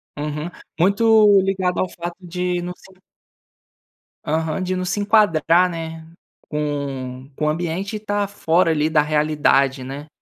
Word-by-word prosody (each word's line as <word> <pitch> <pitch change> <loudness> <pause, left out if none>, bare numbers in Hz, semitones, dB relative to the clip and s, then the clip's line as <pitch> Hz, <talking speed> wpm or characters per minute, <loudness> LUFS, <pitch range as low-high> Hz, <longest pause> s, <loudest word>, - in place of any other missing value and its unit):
Uhum. 150 +2 -4 0.3
Muito 205 +2 +5
ligado 190 -2 0
ao 185 - +1
fato 170 0 -6
de 180 0 -2
não 175 +1 -5
se 190 - -18 1.3
Aham, 160 +3 -1
de 185 0 -1
não 185 0 -2
se 180 +3 -1
enquadrar, 185 -4 +3
né, 165 -1 -6 0.4
com 140 -3 -4
com 150 - -2
o - - +2
ambiente 175 +5 -3
e - - -2
estar 205 -1 -2
fora 175 -3 +1
ali 155 0 +1
da 155 -2 +4
realidade, 150 -3 +2
né? 140 +3 -7
165 Hz, 145 wpm, -21 LUFS, 150-185 Hz, 1.3 s, Muito